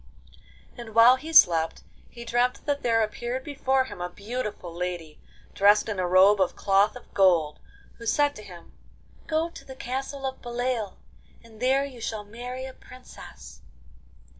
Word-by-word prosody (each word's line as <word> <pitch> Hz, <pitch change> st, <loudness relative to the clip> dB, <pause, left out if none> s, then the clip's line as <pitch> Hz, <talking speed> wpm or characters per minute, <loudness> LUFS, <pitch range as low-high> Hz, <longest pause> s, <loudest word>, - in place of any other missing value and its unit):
And 230 Hz, -2 st, -10 dB
while 235 Hz, +3 st, +7 dB
he 315 Hz, +4 st, -8 dB
slept 165 Hz, -, +5 dB, 0.3 s
he 235 Hz, -1 st, -11 dB
dreamt 245 Hz, +2 st, 0 dB
that 285 Hz, -1 st, -1 dB
there 230 Hz, -2 st, +2 dB
appeared 240 Hz, +4 st, -4 dB
before 270 Hz, -2 st, 0 dB
him 260 Hz, -, -9 dB
a 175 Hz, -, -3 dB
beautiful 205 Hz, -3 st, -6 dB
lady, 170 Hz, -3 st, -5 dB, 0.3 s
dressed 205 Hz, +2 st, +4 dB
in 210 Hz, -3 st, -3 dB
a 180 Hz, -, 0 dB
robe 190 Hz, +3 st, +5 dB
of 185 Hz, -, +1 dB
cloth 200 Hz, +3 st, +2 dB
of 250 Hz, -, -14 dB
gold, 170 Hz, -6 st, +3 dB, 0.4 s
who 230 Hz, -, -8 dB
said 290 Hz, +2 st, +2 dB
to -, -, -9 dB
him: 180 Hz, -4 st, -13 dB, 0.6 s
'Go 320 Hz, +1 st, -1 dB
to -, -, -12 dB
the 265 Hz, -, -11 dB
castle 270 Hz, +2 st, -5 dB
of 265 Hz, 0 st, -5 dB
Beloeil, 240 Hz, -3 st, -3 dB, 0.5 s
and 225 Hz, -2 st, -17 dB
there 265 Hz, +3 st, +2 dB
you 255 Hz, -4 st, -11 dB
shall 220 Hz, -1 st, -4 dB
marry 245 Hz, +4 st, -7 dB
a 265 Hz, -, -9 dB
princess. 65 Hz, -, -14 dB
235 Hz, 165 wpm, -26 LUFS, 195-260 Hz, 0.6 s, while